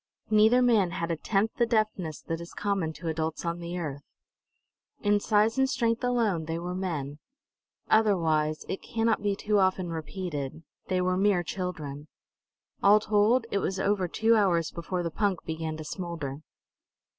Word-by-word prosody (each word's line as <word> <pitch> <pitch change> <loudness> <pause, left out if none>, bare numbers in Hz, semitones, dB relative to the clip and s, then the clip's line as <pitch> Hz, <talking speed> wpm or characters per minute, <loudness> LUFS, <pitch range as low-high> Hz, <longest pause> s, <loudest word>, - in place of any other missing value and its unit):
Neither 220 +4 +5
man 220 -7 +4
had 170 0 -2
a - - +1
tenth 205 +6 0
the 235 - +3
deftness 215 -8 -1
that 165 0 -4
is 170 - -10
common 195 -6 -1
to 165 +3 -8
adults 160 +1 -2
on 170 0 -2
the 170 +1 -5
earth. 145 -5 -4 1.0
In 205 0 +3
size 220 +3 +2
and 265 0 +3
strength 230 -1 0
alone 225 -10 +1
they 165 +1 -3
were 175 +1 -4
men; 155 -6 -3 0.7
otherwise 160 -8 +2
it 190 - -4
cannot 225 -1 0 0.2
too 210 -1 +1
often 185 -1 +2
be - - -4
repeated 160 -3 -5 0.2
they 185 -1 +1
were 185 0 +1
mere 195 -2 +3
children. 155 -6 -5 0.7
All 205 +2 +6
told, 215 +3 +3
it 200 - +1
was 190 0 -2
over 195 -2 +1
two 225 +6 +3
hours 175 -6 +2
before 175 +1 -3
the 170 - -2
punk 200 -1 0
began 160 -1 -4
to 155 - -6
smolder. 155 -5 -5
185 Hz, 165 wpm, -28 LUFS, 165-210 Hz, 1.0 s, All